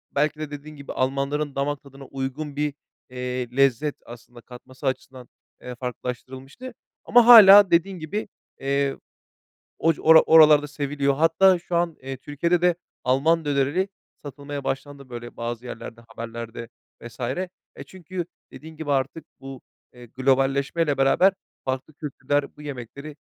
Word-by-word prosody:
belki 150 +1 0
de 155 -1 -5
dediğin 145 +1 -9
gibi, 140 -2 -9
Almanların 140 +2 -1
damak 145 +1 -2
tadına 135 0 -13
uygun 135 +2 -5
bir, 150 0 -1 0.4
eee, 125 0 -4
lezzet 135 +2 +2
aslında 120 0 -13
katması 130 +3 -10
açısından, 130 -1 -5 0.3
eee, 125 0 -8
farklılaştırılmıştı 130 - -7 0.3
ama 240 0 +5
hâlâ 205 -5 +10
dediğin 175 +2 +2
gibi, 180 +8 -4 0.3
eee, 140 0 -1 0.8
oc 165 0 +1
ora 160 0 +8
oralarda 150 -2 +6
seviliyor. 140 -1 -1
Hatta 165 +5 +4
şu 175 0 -5
an, 170 -1 0
eee, 135 0 -6
Türkiye'de 170 +6 -1
de 180 -1 +3 0.3
Alman 155 +6 +2
dönerini 145 +7 0 0.4
satılmaya 145 0 -7
başlandı, 140 0 -5
böyle, 120 -1 -9
bazı 120 +1 -5
yerlerde, 115 -1 -9
haberlerde 115 0 -8 0.3
vs. 120 +1 -12 0.6
E, - - -9
çünkü, 185 -1 -7 0.3
dediğin 160 +1 -12
gibi 155 -2 -4
artık 140 +4 -1
bu, 135 -1 -10 0.3
eee, 125 0 -13
globalleşmeyle 135 +4 0
beraber, 160 +8 +4 0.3
farklı 130 +3 -4
kültürler, 145 -1 -3
bu 150 - -12
yemekleri, 140 +1 -8
140 Hz, 135 wpm, -24 LUFS, 130-155 Hz, 0.8 s, hâlâ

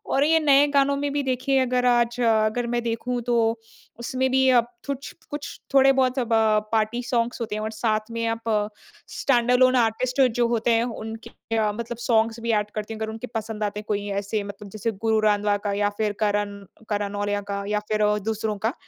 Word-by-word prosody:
और 275 - +4
ये 320 +2 +4
नए 290 -1 +5
गानों 280 0 +3
में 285 0 -2
भी 290 -1 0
देखिए 265 +1 0
अगर 250 -1 +1
आज 240 0 +2
अगर 225 +1 +2
मैं 240 0 -1
देखूँ 240 +1 -2
तो 240 - +2 0.6
उसमें 260 +2 -1
भी 265 0 +3
अब 235 - -2 0.2
कुछ-कुछ 280 +2 -6
थोड़े 270 0 +6
बहुत 265 0 +1
अब 235 -2 -1 0.4
पार्टी 225 +2 0
सॉन्ग्स 240 0 -1
होते 215 -2 -3
हैं 215 - -3
और 220 +1 -3
साथ 215 0 -1
में 230 0 -2
आप 225 - -13 0.8
स्टैंड 245 -3 +2
अलोन 255 +1 +5
आर्टिस्ट 250 +3 +1 0.2
जो 235 - +4
होते 235 0 +1
हैं 230 +1 +3
उनके 225 -1 -6 0.5
मतलब 235 0 -5
सॉन्ग्स 230 -1 +2
भी 230 0 -1
ऐड 210 -1 +1
करते 215 +1 -4
हैं 220 - -8
अगर 220 - -3
उनके 225 +3 -7
पसंद 220 -1 -3
आते 205 0 -2
हैं 210 - -10
कोई 205 -1 -2 0.2
ऐसे 205 +1 -2
मतलब 200 0 -9
जैसे 215 +2 -2
गुरु 220 +2 0
रंधावा 210 -1 +2
का 205 - 0
या 205 0 +1
फिर 215 -1 0
करण 205 -1 0 0.3
करण 205 -1 -1
नौल्या 205 0 -1
का 200 0 -3
या 210 0 0
फिर 215 0 +2 0.2
दूसरों 220 -1 -2
का 230 - +1
230 Hz, 200 wpm, -24 LUFS, 215-250 Hz, 0.8 s, थोड़े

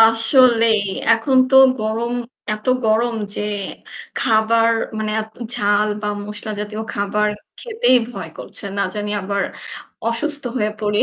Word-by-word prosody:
আসলেই 225 0 +5 0.3
এখন 230 +4 +1
তো 265 - +5 0.2
গরম 225 +3 -2 0.4
এত 215 - -11 0.2
গরম 230 +2 +2 0.2
যে - - -4 0.8
খাবার 225 0 +3 0.3
মানে 215 0 -2
আপ 220 - -7 0.3
ঝাল 205 +1 +2
বা 210 - -1 0.2
মসলা 210 +1 -6
জাতীয় 210 +1 -5
খাবার 210 +1 0 0.3
খেতেই 460 - +2
ভয় - - -7
করছে। - - -8
না 200 - +1
জানি 210 0 -3
আবার 200 +1 -2 0.7
অসুস্থ 290 +4 -1
হয়ে 210 -2 0
পড়ি। 210 -1 +1
220 Hz, 130 wpm, -19 LUFS, 210-235 Hz, 0.8 s, আসলেই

